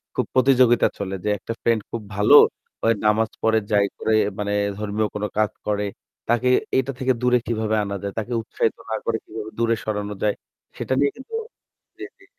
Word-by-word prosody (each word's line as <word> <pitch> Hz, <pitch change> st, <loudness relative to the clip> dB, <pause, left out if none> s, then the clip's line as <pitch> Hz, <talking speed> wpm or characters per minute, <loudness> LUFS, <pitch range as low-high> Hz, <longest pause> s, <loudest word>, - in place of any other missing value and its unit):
খুব -, -, 0 dB
প্রতিযোগিতা 130 Hz, -2 st, +5 dB
চলে। 95 Hz, -1 st, -4 dB
যে 105 Hz, -, 0 dB
একটা 115 Hz, +3 st, -5 dB
ফ্রেন্ড 115 Hz, -2 st, +2 dB
খুব 115 Hz, -, -4 dB
ভালো 105 Hz, +1 st, +5 dB, 0.5 s
অয় 115 Hz, -, +4 dB
নামাজ 110 Hz, +1 st, +3 dB
পড়ে 110 Hz, 0 st, +4 dB
যাই 100 Hz, -1 st, +4 dB
করে 110 Hz, -, 0 dB, 0.3 s
মানে 100 Hz, 0 st, -1 dB, 0.3 s
ধর্মীয় 105 Hz, +1 st, -1 dB
কোনো 105 Hz, 0 st, -1 dB
কাজ 110 Hz, 0 st, +2 dB, 0.2 s
করে। 105 Hz, -1 st, 0 dB, 0.4 s
তাকে 120 Hz, +2 st, +2 dB, 0.3 s
এটা 130 Hz, +1 st, +1 dB
থেকে 130 Hz, -1 st, +2 dB
দূরে 125 Hz, 0 st, +4 dB
কিভাবে 110 Hz, -2 st, 0 dB
আনা 100 Hz, 0 st, -4 dB
যায়, 100 Hz, -, -4 dB
তাকে 115 Hz, +3 st, -4 dB
উৎসাহিত 110 Hz, 0 st, -1 dB
না 110 Hz, -, -1 dB
করে 115 Hz, -1 st, 0 dB
কিভাবে 110 Hz, 0 st, -7 dB
দূরে 115 Hz, 0 st, +2 dB
সরানো 105 Hz, -1 st, -3 dB
যায় 105 Hz, -, +2 dB, 0.4 s
সেটা -, -, -2 dB
নিয়ে 140 Hz, 0 st, +3 dB
কিন্তু 265 Hz, +12 st, -13 dB, 0.7 s
জি, -, -, -5 dB
জি। 400 Hz, -, -20 dB
110 Hz, 185 wpm, -23 LUFS, 105-120 Hz, 0.7 s, প্রতিযোগিতা